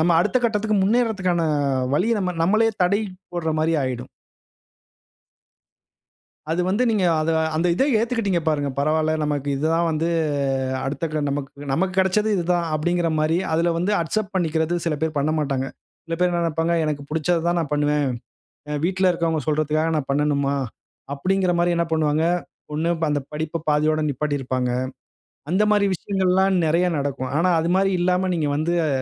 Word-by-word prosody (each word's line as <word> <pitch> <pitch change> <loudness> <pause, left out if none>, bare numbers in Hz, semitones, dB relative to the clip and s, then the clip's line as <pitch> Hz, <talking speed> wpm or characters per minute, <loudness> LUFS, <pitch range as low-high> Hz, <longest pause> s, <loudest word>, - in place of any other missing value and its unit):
நம்ம 175 +2 +3
அடுத்த 210 +7 +1
கட்டத்துக்கு 215 -1 +1
முன்னேறதுக்கான 200 -6 +1 0.5
வழிய 225 +7 +2
நம்ம 180 -2 -2
நம்மளே 220 +5 +3
தடை 200 +4 +2 0.3
போடுற 160 -2 -1
மாரி 165 +1 +1
ஆயிடும். 125 -1 -4 2.4
அது 170 +2 +1
வந்து 205 +6 +1
நீங்க 210 -4 +1 0.2
அத 155 - 0 0.3
அந்த 165 +3 +1
இத 265 - +2 0.2
ஏத்துக்கிட்டீங்க, 225 -6 0
பாருங்க. 145 -2 0
பரவால்ல, 155 +2 +1
நமக்கு 145 -1 -2
இது 140 - -3
தான் 170 0 +2
வந்து, 160 +1 0 0.8
அடுத்த 140 +4 -2
க 155 - 0
நமக்கு 140 0 -5
நமக்கு 185 +6 0
கிடைச்சது 190 +3 +2
இது 175 - 0
தான். 175 -1 +1
அப்டிங்கற 175 +2 0
மாரி, 155 +2 +2 0.2
அதில 170 +1 +2
வந்து 180 +5 0
அக்செப்ட் 195 +5 -2
பண்ணிக்கிறது 160 -1 0
சில 155 -2 0
பேர் 160 -1 -1
பண்ணமாட்டாங்க. 140 -2 0 0.4
சில 165 -1 -3
பேர் 180 - +3
என்ன 175 0 0
நினைப்பாங்க, 165 +1 0
"எனக்கு 150 -2 -2
புடிச்சத 160 +2 +1
தான் 175 0 +1
நான் 150 -3 -3
பண்ணுவேன். 150 0 +1 0.6
அ - - -2
வீட்ல 190 0 +2
இருக்குறவங்க 165 -2 0
சொல்றதுகாக 155 +1 +1
நான் 140 -2 -4
பண்ணணுமா?" 140 -1 +1 0.6
அப்டிங்கற 185 +5 +1
மாரி 175 0 +2
என்ன 170 0 +1
பண்ணுவாங்க? 155 0 +1 0.5
1 160 +3 0 0.2
அந்த 145 -1 +1
படிப்ப 155 +1 -3
பாதியோட 155 +1 +2
நிப்பாட்டி 145 +2 -1
இருப்பாங்க. 130 -1 -1 0.8
அந்த 190 +4 +2
மாரி 205 -1 +3
விஷயங்கள்லாம் 190 +1 +1
நிறைய 170 +3 +2
நடக்கும். 140 -2 -3
ஆனா, 175 +3 +2
அது 165 - -1
மாரி 195 0 +2
இல்லாம 180 +1 +1
நீங்க 155 -3 0
வந்து, 165 +3 0
அ - - 0
165 Hz, 160 wpm, -22 LUFS, 150-185 Hz, 2.4 s, நம்ம